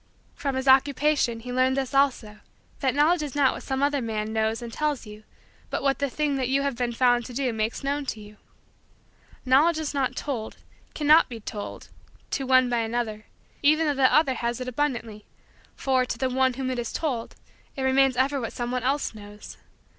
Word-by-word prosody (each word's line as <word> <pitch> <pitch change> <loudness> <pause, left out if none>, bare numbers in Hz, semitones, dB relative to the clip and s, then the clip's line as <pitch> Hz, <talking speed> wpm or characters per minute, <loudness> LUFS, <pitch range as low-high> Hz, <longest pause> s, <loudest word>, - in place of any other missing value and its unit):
From 280 -5 -3
his 260 +1 -3
Occupation, 270 -2 +3
he 245 +1 -6
learned 260 +1 +2
this 270 -1 -2
also: 250 -6 +1 0.4
that 265 -2 0
Knowledge 310 +4 +3
is 290 -3 -5
not 280 -2 +3
what - - -7
some 265 0 -2
other 285 -1 +1
man 220 -2 -3
knows 220 +2 0
and 230 -1 -8
tells 300 -2 -1
you 210 0 -11 0.5
but - - -3
what 275 -1 +1
the 280 -1 0
thing 290 +1 -1
that 260 -2 -1
you 275 +1 +2
have 280 -3 -1 0.2
found 245 -1 +3
to 250 - -9
do 260 -3 0
makes 220 +3 -2
known 280 0 -2
to 220 - -3
you. 210 0 -13 1.1
Knowledge 295 +6 +4
is 315 -2 -3
not 275 -2 -1
told, 240 -7 -4 0.4
cannot 305 +1 +5
be 235 -2 -7
told, 210 -1 -7 0.4
to 270 -2 -2
one 255 -1 +5
by 240 -1 0
another, 225 -2 -3 0.3
even 310 +2 +4
though 295 - +2
that 265 -2 +3
other 305 -4 +4
has 235 -1 -3
it 255 - -5
abundantly 235 -5 -3 0.5
for, 260 -1 +1
to 250 - -4
the 260 -1 -1
one 260 0 +2
to - - -13
whom 260 -1 -2
it 250 - -3
is 235 - -4
told, 255 -8 -3 0.4
it 270 - -4
remains 265 -1 +3
ever 270 +1 +1
what 230 - -5
someone 245 +1 -2
else 270 +2 -1
knows. 205 -1 -11
260 Hz, 200 wpm, -25 LUFS, 235-280 Hz, 1.1 s, cannot